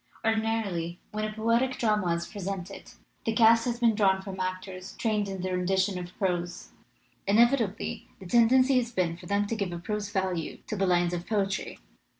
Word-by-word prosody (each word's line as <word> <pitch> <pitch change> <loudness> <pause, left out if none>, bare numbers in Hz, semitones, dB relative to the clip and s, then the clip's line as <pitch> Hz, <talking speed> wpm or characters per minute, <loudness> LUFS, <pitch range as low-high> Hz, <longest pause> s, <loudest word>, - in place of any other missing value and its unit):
Ordinarily 220 -6 0
when 215 0 -2
a 215 - -3
poetic 230 +4 +1
drama 210 -8 +1
is 170 0 -3
presented 195 -1 -6 0.3
the 225 - 0
cast 230 0 +5
has 240 -1 -2
been 235 -2 +4
drawn 195 -3 +3
from 190 -1 -7
actors 185 0 -5
trained 210 -3 0
in 190 -2 -5
the 185 - -2
rendition 190 +1 +1
of 175 0 -9
prose. 180 -3 -2 0.6
Inevitably 225 0 +2
the 190 - -11
tendency 255 +6 +5
has 240 -1 0
been 180 -6 0
for - - -12
them 200 +1 +1
to 230 - -2
give 200 -4 -2
a 175 - -4
prose 210 +3 -3
value 190 -5 -2
to 215 - -4
the 195 -1 +1
lines 175 -1 +2
of 175 0 -4
poetry. 200 -3 -1
200 Hz, 180 wpm, -28 LUFS, 185-225 Hz, 0.6 s, cast